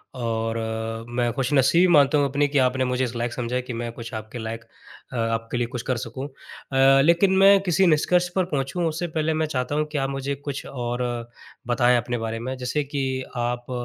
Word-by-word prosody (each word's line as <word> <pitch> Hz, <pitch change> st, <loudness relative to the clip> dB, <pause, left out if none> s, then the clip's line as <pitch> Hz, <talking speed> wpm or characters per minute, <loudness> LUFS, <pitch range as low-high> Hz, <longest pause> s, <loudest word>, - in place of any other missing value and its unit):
और 115 Hz, -2 st, -2 dB
अ, 110 Hz, 0 st, -4 dB
मैं 120 Hz, -1 st, +1 dB
खुश 135 Hz, 0 st, -1 dB
नसीबी 145 Hz, +7 st, +5 dB
मानता 145 Hz, 0 st, +5 dB
हूँ 145 Hz, -, +3 dB
अपनी, 145 Hz, +1 st, +1 dB
कि 145 Hz, 0 st, -1 dB
आपने 130 Hz, 0 st, +2 dB
मुझे 125 Hz, +1 st, 0 dB
इस 120 Hz, -1 st, -3 dB
लायक 120 Hz, 0 st, -2 dB
समझा 125 Hz, +1 st, -2 dB
कि 125 Hz, -, -4 dB
मैं 120 Hz, -1 st, -4 dB
कुछ 115 Hz, -1 st, -9 dB
आपके 110 Hz, +2 st, -6 dB
लायक 115 Hz, +1 st, -5 dB, 0.5 s
अ, -, -, -5 dB
आपके 115 Hz, +1 st, -1 dB
लिए 120 Hz, -1 st, 0 dB
कुछ 125 Hz, -1 st, -5 dB
कर 125 Hz, -, +1 dB
सकूँ। 125 Hz, +3 st, -5 dB
अ, 135 Hz, 0 st, +1 dB
लेकिन 170 Hz, +4 st, +4 dB
मैं 195 Hz, 0 st, +7 dB
किसी 180 Hz, 0 st, +3 dB
निष्कर्ष 175 Hz, +3 st, +3 dB
पर 185 Hz, -2 st, +2 dB
पहुँचूँ, 150 Hz, +2 st, -2 dB
उससे 170 Hz, +2 st, -2 dB
पहले 160 Hz, 0 st, -1 dB
मैं 160 Hz, 0 st, 0 dB
चाहता 125 Hz, +3 st, -1 dB
हूँ 155 Hz, 0 st, +1 dB
कि 150 Hz, -, -2 dB
आप 135 Hz, 0 st, 0 dB
मुझे 135 Hz, +1 st, -3 dB
कुछ 140 Hz, -1 st, -6 dB
और 120 Hz, -1 st, -4 dB, 0.7 s
बताएँ 120 Hz, 0 st, +3 dB
अपने 120 Hz, +1 st, -2 dB
बारे 115 Hz, 0 st, -3 dB
में, 130 Hz, +3 st, -4 dB
जैसे 130 Hz, +4 st, -1 dB
कि 135 Hz, -2 st, -2 dB
आप 120 Hz, +1 st, -3 dB
130 Hz, 210 wpm, -24 LUFS, 120-145 Hz, 0.7 s, मैं